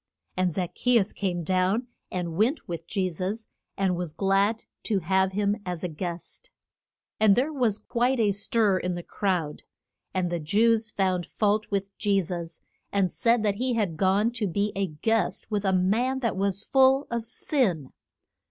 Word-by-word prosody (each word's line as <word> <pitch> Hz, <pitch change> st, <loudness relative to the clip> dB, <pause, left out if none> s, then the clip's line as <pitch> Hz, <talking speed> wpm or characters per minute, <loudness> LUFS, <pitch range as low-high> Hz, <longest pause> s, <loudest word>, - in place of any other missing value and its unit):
And 185 Hz, -1 st, +1 dB
Zac 175 Hz, +1 st, -3 dB
che 245 Hz, -1 st, +3 dB
us 205 Hz, -2 st, +1 dB
came 180 Hz, -4 st, -2 dB
down 185 Hz, +7 st, +1 dB, 0.3 s
and 175 Hz, -3 st, -3 dB
went 235 Hz, -, +1 dB
with 170 Hz, -1 st, -6 dB
Je 190 Hz, -2 st, 0 dB
sus, 190 Hz, +6 st, -4 dB, 0.3 s
and 190 Hz, -2 st, +1 dB
was 175 Hz, -3 st, -4 dB
glad 195 Hz, +5 st, +1 dB, 0.2 s
to 210 Hz, -, 0 dB
have 190 Hz, +2 st, +1 dB
him 205 Hz, +2 st, 0 dB
as 180 Hz, -2 st, -4 dB
a -, -, 0 dB
guest. 175 Hz, -, -6 dB, 0.7 s
And 215 Hz, -2 st, +6 dB
there 275 Hz, +7 st, +1 dB
was 240 Hz, -7 st, +1 dB
quite 245 Hz, +2 st, 0 dB
a 210 Hz, -3 st, +3 dB
stir 200 Hz, -1 st, +1 dB
in 180 Hz, 0 st, -2 dB
the 175 Hz, -, -6 dB
crowd, 180 Hz, -8 st, -2 dB, 0.5 s
and 180 Hz, -2 st, -1 dB
the 175 Hz, -, -1 dB
Jews 220 Hz, +7 st, +2 dB
found 185 Hz, -4 st, 0 dB
fault 210 Hz, +1 st, 0 dB
with 200 Hz, -1 st, -2 dB
Je 200 Hz, -2 st, +2 dB
sus, 170 Hz, -2 st, -5 dB, 0.3 s
and 195 Hz, -3 st, +1 dB
said 235 Hz, -1 st, +2 dB
that 205 Hz, -2 st, +1 dB
he 255 Hz, -1 st, +1 dB
had 200 Hz, -8 st, 0 dB
gone 195 Hz, +6 st, +2 dB
to 230 Hz, -4 st, -2 dB
be 200 Hz, +3 st, 0 dB
a 195 Hz, 0 st, 0 dB
guest 200 Hz, +7 st, -1 dB
with 205 Hz, -1 st, 0 dB
a 190 Hz, -, +3 dB
man 225 Hz, +9 st, +1 dB
that 230 Hz, -6 st, 0 dB
was 200 Hz, +1 st, -1 dB
full 265 Hz, +1 st, +4 dB
of 235 Hz, -1 st, -1 dB
sin. 200 Hz, -, -1 dB
195 Hz, 180 wpm, -26 LUFS, 180-225 Hz, 0.7 s, And